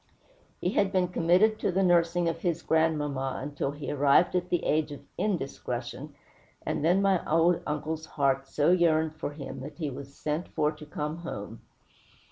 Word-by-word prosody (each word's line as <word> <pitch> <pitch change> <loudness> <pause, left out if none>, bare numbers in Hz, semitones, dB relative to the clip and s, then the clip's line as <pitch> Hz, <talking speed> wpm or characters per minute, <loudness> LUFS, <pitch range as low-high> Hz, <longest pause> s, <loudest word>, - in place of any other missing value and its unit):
He 180 - 0
had 200 -2 +2
been 180 -2 +1
committed 180 +6 +3
to - - 0
the 190 +2 +1
nursing 175 -1 +3
of 165 0 -1
his 170 -2 -1
grandmamma 145 -4 0
till 135 - -1
he 145 0 -7
had 145 - -3
arrived 145 +6 +4
at 180 0 0
the 175 - 0
age 155 0 +1
of 140 -1 -9
_in_discretion, 140 - -3 0.5
and - - -1
then 180 +5 +3
my 195 -3 +3
old 165 +2 +4
uncle's 155 +2 -3
heart 135 -1 0
so 150 +4 +2
yearned 160 -3 +3
for 155 -2 -5
him 140 -2 -7
that 140 +4 -8
he 155 -5 -3
was 140 +1 -9
sent 155 +3 -2
for 150 -1 0
to 150 -1 -12
come 150 +1 -4
home. 115 -10 -7
155 Hz, 180 wpm, -28 LUFS, 145-175 Hz, 0.5 s, arrived